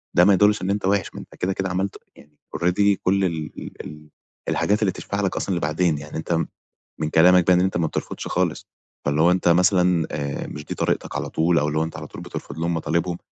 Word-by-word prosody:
ده 90 Hz, -, +6 dB
ما 100 Hz, -, +6 dB
يدُلِّش 105 Hz, +2 st, +4 dB
إن 95 Hz, -, -2 dB
أنت 100 Hz, -1 st, -1 dB
وِحِش، 100 Hz, -1 st, 0 dB
ما -, -, -6 dB
أنت -, -, -12 dB
كده 95 Hz, +1 st, -1 dB
كده 95 Hz, 0 st, -2 dB
عملت 95 Hz, +2 st, -2 dB, 0.2 s
يعني 75 Hz, 0 st, -19 dB, 0.2 s
already 100 Hz, +3 st, +2 dB
كل 95 Hz, +1 st, +2 dB
ال 80 Hz, -3 st, -3 dB, 0.3 s
ال 75 Hz, +1 st, -11 dB, 0.4 s
الحاجات 105 Hz, +2 st, +1 dB
اللي 100 Hz, -3 st, +2 dB
تشفع 100 Hz, +2 st, -4 dB
لك 95 Hz, -2 st, -1 dB
أصلًا 95 Hz, -, -1 dB
لبعدين، 80 Hz, 0 st, +1 dB
يعني 75 Hz, +2 st, -7 dB
أنت 80 Hz, +1 st, -1 dB, 0.5 s
من 75 Hz, -1 st, -1 dB
كلامك 90 Hz, +2 st, +5 dB
ده 90 Hz, -, +6 dB
إن 90 Hz, -, +4 dB
أنت 95 Hz, -1 st, 0 dB
ما 85 Hz, -2 st, +1 dB
بترفضش -, -, -5 dB
خالص، -, -, -1 dB, 0.4 s
فاللي 70 Hz, +2 st, +1 dB
هو 85 Hz, +2 st, +5 dB
أنت 90 Hz, -1 st, +1 dB
مثلًا 90 Hz, -1 st, +3 dB
آآ، 70 Hz, -2 st, -3 dB
مش 75 Hz, 0 st, -8 dB
دي -, -, -5 dB
طريقتك -, -, -1 dB
على -, -, -3 dB
طول 85 Hz, +1 st, +2 dB
أو 75 Hz, -, 0 dB
اللي 75 Hz, +1 st, 0 dB
هو -, -, +2 dB
أنت 80 Hz, -, -6 dB
على -, -, -7 dB
طول -, -, -10 dB
بترفض -, -, -7 dB
لهم 85 Hz, +1 st, 0 dB
مطالبهم، 85 Hz, +1 st, -1 dB
90 Hz, 230 wpm, -23 LUFS, 80-95 Hz, 0.5 s, ده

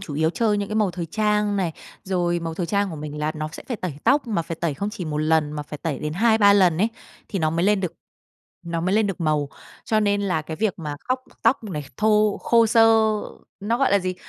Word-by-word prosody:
chủ 165 Hz, -7 st, -7 dB
yếu 160 Hz, +2 st, +2 dB
chơi 210 Hz, +2 st, +1 dB
những 200 Hz, -, -3 dB
cái 215 Hz, -, -3 dB
màu 210 Hz, -4 st, +2 dB
thời 175 Hz, -1 st, -5 dB
trang 210 Hz, +1 st, +1 dB
này, 180 Hz, -4 st, -1 dB, 0.3 s
rồi 175 Hz, -2 st, 0 dB
màu 165 Hz, -1 st, -4 dB
thời 175 Hz, 0 st, -2 dB
trang 200 Hz, 0 st, 0 dB
của 160 Hz, -, -6 dB
mình 150 Hz, 0 st, -6 dB
là 150 Hz, +1 st, -1 dB
nó 155 Hz, 0 st, -4 dB
sẽ -, -, -9 dB
phải 245 Hz, -, -2 dB
tẩy 185 Hz, -5 st, -4 dB
tóc, 280 Hz, -1 st, +3 dB
mà 210 Hz, -7 st, -1 dB
phải 165 Hz, 0 st, -6 dB
tẩy 165 Hz, -4 st, 0 dB
không 200 Hz, +8 st, -3 dB
chỉ 190 Hz, -, -6 dB
1 150 Hz, -2 st, -3 dB
lần 155 Hz, -1 st, +2 dB
mà 150 Hz, -1 st, -4 dB
phải 150 Hz, 0 st, -9 dB
tẩy 155 Hz, -3 st, -3 dB
đến 150 Hz, 0 st, -3 dB
2-3 215 Hz, +2 st, +5 dB
lần 180 Hz, -5 st, +4 dB
ấy 210 Hz, +4 st, +3 dB, 0.4 s
thì 195 Hz, -, -3 dB
nó 155 Hz, -2 st, +1 dB
mới 170 Hz, +2 st, 0 dB
lên 205 Hz, 0 st, +3 dB
được 180 Hz, -4 st, -2 dB, 0.7 s
nó 170 Hz, -1 st, -3 dB
mới 185 Hz, +4 st, 0 dB
lên 220 Hz, -1 st, +3 dB
được 195 Hz, -4 st, -4 dB
màu. 150 Hz, -3 st, +1 dB, 0.4 s
Cho 215 Hz, -1 st, +1 dB
nên 205 Hz, -1 st, +1 dB
là 180 Hz, -6 st, 0 dB
cái 160 Hz, +1 st, -6 dB
việc 210 Hz, -2 st, -1 dB
mà 150 Hz, -3 st, -5 dB
khóc 255 Hz, 0 st, -2 dB, 0.2 s
tóc 230 Hz, +1 st, +2 dB
này 155 Hz, -8 st, -5 dB
thô 215 Hz, -1 st, +3 dB
khô 230 Hz, -1 st, +4 dB
xơ, 225 Hz, +1 st, +5 dB, 0.8 s
nó 225 Hz, +4 st, 0 dB
gọi 275 Hz, -, +2 dB
là 200 Hz, -, +5 dB
gì? 185 Hz, -1 st, -3 dB
185 Hz, 255 wpm, -23 LUFS, 160-210 Hz, 0.8 s, 2-3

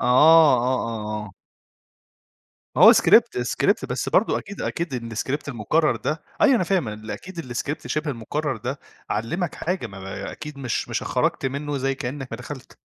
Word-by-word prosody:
آه، -, -, 0 dB
آه، 150 Hz, +2 st, +7 dB, 0.3 s
آه، 105 Hz, -2 st, -4 dB
آه. 100 Hz, -, -13 dB, 1.4 s
ما -, -, +4 dB
هو -, -, +11 dB
script -, -, +5 dB
-script -, -, +1 dB
بس -, -, -2 dB
برضه -, -, +2 dB
أكيد، 200 Hz, 0 st, -9 dB
أكيد 125 Hz, -9 st, -3 dB
الscript 140 Hz, +6 st, -3 dB
المُكرّر 140 Hz, +6 st, +1 dB
ده 155 Hz, 0 st, -3 dB, 0.2 s
أيوه 275 Hz, -3 st, +6 dB
أنا 185 Hz, -, +1 dB
فاهم 175 Hz, -, 0 dB
إن 110 Hz, +1 st, -7 dB
أكيد 170 Hz, -8 st, -7 dB
الscript 145 Hz, +5 st, -3 dB
شِبه 155 Hz, 0 st, -1 dB
المُكرّر 135 Hz, +2 st, -3 dB
ده، 125 Hz, +6 st, -4 dB, 0.3 s
علّمك 145 Hz, -, -2 dB
حاجة. 180 Hz, -4 st, -2 dB
ما 100 Hz, -2 st, -11 dB
ما 95 Hz, 0 st, -6 dB
أكيد 150 Hz, -2 st, -8 dB
مش 130 Hz, -4 st, -2 dB
مش -, -, -2 dB
خرجت -, -, 0 dB
منّه 140 Hz, +2 st, -3 dB
زي 135 Hz, +1 st, 0 dB
كإنّك 135 Hz, +1 st, -5 dB
ما 115 Hz, -, -4 dB
دخلت. 130 Hz, +2 st, -10 dB
135 Hz, 175 wpm, -23 LUFS, 115-155 Hz, 1.4 s, هو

